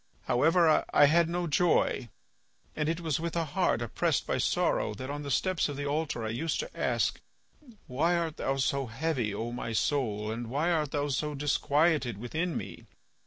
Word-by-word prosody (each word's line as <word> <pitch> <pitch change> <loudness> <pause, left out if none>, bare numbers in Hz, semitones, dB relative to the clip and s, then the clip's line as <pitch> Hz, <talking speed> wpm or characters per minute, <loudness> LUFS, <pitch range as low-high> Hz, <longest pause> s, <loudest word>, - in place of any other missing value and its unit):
However, 160 +5 +4
I 145 - +6
had 165 +3 +4
no 175 +1 -1
joy, 155 -6 +1 0.7
and 150 0 0
it 165 +1 -2
was 160 -4 -1
with 170 +1 -3
a 165 -1 0
heart 155 -6 0
oppressed 115 - 0
by - - -1
sorrow 105 - +1
that, 130 +6 -6
on 145 0 -4
the 145 - -6
steps 185 +4 +1
of 145 - -5
the 145 - -3
altar 145 -5 -2
I - - -2
used 150 +9 -2
to - - -9
ask, - - 0 0.6
'Why 160 +7 +1
art 165 -2 -2
thou 135 0 -1
so 135 0 0
heavy, 125 -2 -1
O 115 +4 -4
my 120 -1 -4
soul, 110 -5 0
and 115 +1 -5
why 150 +7 0
art 155 -4 +1
thou 145 0 -1
so 150 +2 -1
disquieted 145 - +1
within 155 - -2
me? - - -8
145 Hz, 185 wpm, -29 LUFS, 125-165 Hz, 0.7 s, I